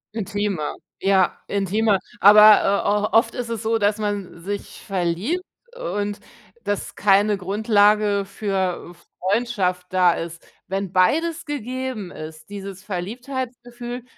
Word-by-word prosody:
Intimer, 205 Hz, -6 st, -2 dB, 0.2 s
ja, 190 Hz, -2 st, +2 dB
intimer. 200 Hz, +1 st, +1 dB, 0.2 s
Aber, 210 Hz, +1 st, +8 dB, 0.2 s
äh, 210 Hz, +1 st, +2 dB
o -, -, +7 dB
oft 230 Hz, -, +2 dB
ist 245 Hz, -2 st, -4 dB
es 230 Hz, -1 st, -4 dB
so, 225 Hz, +1 st, +1 dB
dass 205 Hz, 0 st, +1 dB
man 205 Hz, -5 st, -4 dB
sich 205 Hz, +2 st, -6 dB
verliebt 195 Hz, -, -1 dB, 0.3 s
und 205 Hz, -, -3 dB, 0.4 s
dass 205 Hz, -1 st, -3 dB
keine 205 Hz, +1 st, +3 dB
Grundlage 205 Hz, +1 st, +2 dB
für, 190 Hz, -3 st, -2 dB
äh, -, -, -14 dB, 0.4 s
Freundschaft 200 Hz, -6 st, 0 dB
da 180 Hz, -2 st, +5 dB
ist. 165 Hz, 0 st, -7 dB, 0.2 s
Wenn 195 Hz, -1 st, -3 dB
beides 320 Hz, -, +2 dB
gegeben 255 Hz, -7 st, -4 dB
ist, 155 Hz, +1 st, -10 dB
dieses 195 Hz, -2 st, -8 dB
Verliebtheitsgefühl 240 Hz, +4 st, -5 dB
205 Hz, 125 wpm, -22 LUFS, 190-230 Hz, 0.4 s, Aber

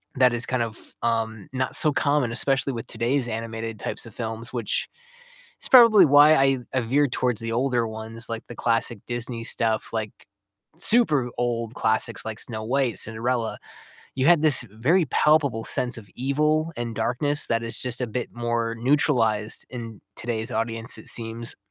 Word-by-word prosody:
that 125 Hz, -2 st, +4 dB
is 120 Hz, +1 st, -1 dB
kind 130 Hz, -2 st, -2 dB
of, 115 Hz, -1 st, -6 dB, 0.3 s
um, 115 Hz, -3 st, -2 dB
not 130 Hz, 0 st, -2 dB
so 150 Hz, -2 st, +7 dB
common, 140 Hz, -6 st, 0 dB
especially 135 Hz, +1 st, 0 dB
with 115 Hz, -, -6 dB
today's 120 Hz, +3 st, -2 dB
animated 115 Hz, -1 st, -5 dB
types -, -, -5 dB
of 115 Hz, -, -12 dB
films, 115 Hz, 0 st, -6 dB
which 120 Hz, -4 st, -3 dB, 0.7 s
is -, -, -3 dB
probably 230 Hz, -7 st, +8 dB
why 145 Hz, +2 st, +7 dB
I 135 Hz, -2 st, +2 dB
I 130 Hz, -, +1 dB
veered 135 Hz, +3 st, +1 dB
towards 125 Hz, -3 st, -1 dB
the 115 Hz, 0 st, -4 dB
older 120 Hz, -1 st, 0 dB
ones, 110 Hz, +1 st, -7 dB
like, 115 Hz, 0 st, -5 dB
the 120 Hz, -, -10 dB
classic 115 Hz, -1 st, -1 dB
Disney 120 Hz, -1 st, -5 dB
stuff, 110 Hz, -2 st, -1 dB
like, 110 Hz, -2 st, -3 dB, 0.7 s
super 160 Hz, -, +5 dB
old 115 Hz, -1 st, -2 dB
classics 110 Hz, -1 st, -1 dB
like 110 Hz, 0 st, -6 dB
Snow 110 Hz, -2 st, -6 dB
White, 125 Hz, 0 st, -1 dB
Cinderella. 115 Hz, +1 st, -1 dB, 0.6 s
You 130 Hz, 0 st, -1 dB
had 170 Hz, -3 st, +5 dB
this 140 Hz, -5 st, +6 dB
very 140 Hz, -, +1 dB
palpable 140 Hz, -7 st, +1 dB
sense 125 Hz, -1 st, 0 dB
of 100 Hz, -3 st, -13 dB
evil 150 Hz, +5 st, 0 dB
and 120 Hz, -1 st, -4 dB
darkness 145 Hz, +6 st, 0 dB
that 115 Hz, 0 st, 0 dB
is 115 Hz, 0 st, -4 dB
just 125 Hz, -1 st, -4 dB
a 125 Hz, -, -1 dB
bit 120 Hz, +3 st, -5 dB
more 120 Hz, -1 st, -2 dB
neutralized 115 Hz, -5 st, 0 dB
in 115 Hz, -4 st, -8 dB, 0.2 s
today's 115 Hz, -1 st, -4 dB
audience, 115 Hz, +1 st, -3 dB
it -, -, -9 dB
seems. 115 Hz, 0 st, +2 dB
120 Hz, 170 wpm, -24 LUFS, 115-135 Hz, 0.7 s, probably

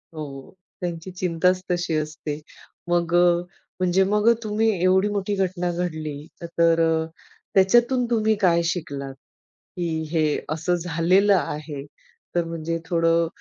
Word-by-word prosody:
हो, 155 Hz, -1 st, -4 dB
हो. 135 Hz, -1 st, -10 dB, 0.3 s
त्यांची 175 Hz, 0 st, -4 dB
चिंताच 180 Hz, 0 st, +1 dB
तशी 175 Hz, -2 st, 0 dB
असते. 155 Hz, -1 st, -3 dB, 0.5 s
मग 170 Hz, -1 st, +1 dB
अ, 175 Hz, 0 st, +4 dB, 0.4 s
म्हणजे 185 Hz, +1 st, +3 dB
मग 210 Hz, +3 st, +3 dB
अ, -, -, +7 dB
तुम्ही 215 Hz, +1 st, +1 dB
एवढी 190 Hz, +2 st, +4 dB
मोठी 205 Hz, 0 st, -1 dB
घटना 180 Hz, -2 st, -1 dB
घडली, 160 Hz, -4 st, -3 dB, 0.3 s
तर 170 Hz, 0 st, +2 dB
अ, 160 Hz, -1 st, +2 dB, 0.5 s
त्याच्यातून 240 Hz, +6 st, +4 dB
तुम्ही 220 Hz, -1 st, +2 dB
काय 170 Hz, -3 st, +4 dB
शिकलात? 140 Hz, -6 st, -3 dB, 0.6 s
की 175 Hz, -1 st, -1 dB, 0.2 s
हे 155 Hz, -3 st, +1 dB
असं 165 Hz, +3 st, 0 dB
झालेलं 180 Hz, +4 st, +3 dB
आहे, 150 Hz, -4 st, -3 dB, 0.5 s
तर 175 Hz, -, +2 dB
म्हणजे 165 Hz, 0 st, -3 dB
थोडं 165 Hz, 0 st, +2 dB
175 Hz, 135 wpm, -23 LUFS, 165-190 Hz, 0.6 s, अ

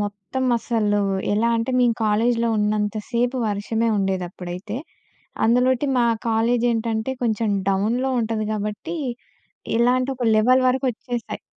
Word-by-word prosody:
మొత్తం 205 Hz, +5 st, -3 dB
అసలు 210 Hz, -3 st, 0 dB, 0.3 s
ఎలా 225 Hz, +3 st, +2 dB
అంటే 230 Hz, +3 st, -1 dB
మేము 240 Hz, -2 st, +3 dB
కాలేజిలో 230 Hz, +2 st, +2 dB
ఉన్నంత 210 Hz, 0 st, 0 dB, 0.2 s
సేపు 245 Hz, +2 st, 0 dB
వర్షమే 220 Hz, +3 st, -1 dB
ఉండేదప్పుడైతే. 185 Hz, +1 st, -3 dB, 0.7 s
అందులోటి 250 Hz, +4 st, +3 dB
మా 240 Hz, -, +4 dB, 0.2 s
కాలేజేంటంటే 230 Hz, 0 st, +1 dB
కొంచెం 220 Hz, -2 st, 0 dB, 0.2 s
డౌన్‌లో 220 Hz, +7 st, +1 dB
ఉంటది 220 Hz, -1 st, -1 dB
గాబట్టి 210 Hz, +11 st, -4 dB, 0.8 s
ఇలాంటి 250 Hz, +2 st, +2 dB
ఒక 245 Hz, -, -3 dB
లెవెల్ 255 Hz, +4 st, +4 dB
వరకొచ్చేసాయి. 250 Hz, -2 st, -2 dB
225 Hz, 110 wpm, -22 LUFS, 210-245 Hz, 0.8 s, మా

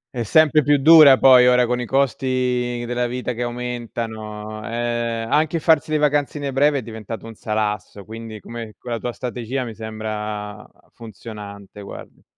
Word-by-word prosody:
È 120 Hz, -, -2 dB
sempre 155 Hz, +6 st, +4 dB
più 145 Hz, +1 st, +3 dB
dura 145 Hz, -2 st, +8 dB
poi, 125 Hz, -2 st, +7 dB
ora 125 Hz, 0 st, +4 dB
con 125 Hz, +1 st, -1 dB
i 120 Hz, -, -5 dB
costi 125 Hz, -2 st, 0 dB
della 120 Hz, 0 st, -1 dB
vita 125 Hz, +1 st, -4 dB
che 120 Hz, -, -6 dB
aumentano. 115 Hz, -3 st, -5 dB
Eh, 115 Hz, 0 st, -2 dB
anche 155 Hz, +5 st, +1 dB
farsi 160 Hz, 0 st, +2 dB
le 155 Hz, -, +1 dB
vacanzine 145 Hz, -1 st, 0 dB
breve 145 Hz, +2 st, +3 dB
è 135 Hz, -, -2 dB
diventato 110 Hz, -1 st, -8 dB
un 115 Hz, -, -9 dB
salasso, 105 Hz, -2 st, -3 dB
quindi 110 Hz, 0 st, -9 dB
come 115 Hz, -1 st, -9 dB
quella 120 Hz, -2 st, -5 dB
tua 120 Hz, -, -4 dB
strategia 125 Hz, +1 st, -4 dB
mi 115 Hz, -, -7 dB
sembra 105 Hz, -1 st, -6 dB, 0.2 s
funzionante, 105 Hz, -2 st, -10 dB
guarda. 100 Hz, -, -11 dB
120 Hz, 155 wpm, -21 LUFS, 110-130 Hz, 0.2 s, dura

